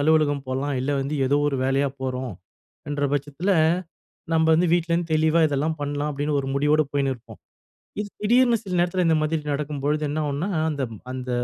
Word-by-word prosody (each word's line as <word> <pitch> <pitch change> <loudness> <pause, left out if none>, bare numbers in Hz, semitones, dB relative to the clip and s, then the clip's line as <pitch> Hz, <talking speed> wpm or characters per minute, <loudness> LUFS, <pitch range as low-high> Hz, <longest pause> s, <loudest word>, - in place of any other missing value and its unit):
அலுவலகம் 145 -2 +2
போலாம். 135 +3 -2
இல்லை 140 +3 0
வந்து 140 +3 -2
ஏதோ 140 - +3
ஒரு 135 - -1
வேலையா 135 +1 +2
போறோம் 130 -3 -3 0.6
என்ற 145 0 -2
பட்சத்தில, 145 +6 -1 0.8
நம்ப 160 0 +3
வந்து 175 +3 +3
வீட்லேருந்து 170 -1 +1
தெளிவா 160 +1 +3
இதெல்லாம் 150 +2 -1
பண்ணலாம் 145 +1 -2
அப்படின்னு 145 +1 -1
ஒரு 135 - -6
முடிவோடு 150 +2 +3
போயின்னுருப்போம். 135 -4 -2 0.6
இது 210 - -3
திடீர்னு 240 +2 +4
சில 185 -4 -3
நேரத்தில 180 +1 +1
இந்த 160 -1 +4
மாதிரி 155 +1 0
நடக்கும்பொழுது 145 +1 -1
என்ன 145 +2 -2
ஆகும்னா, 145 +8 -2 0.2
அந்த 140 -2 -3 0.3
அந்த 130 0 -5
145 Hz, 165 wpm, -24 LUFS, 140-160 Hz, 0.8 s, திடீர்னு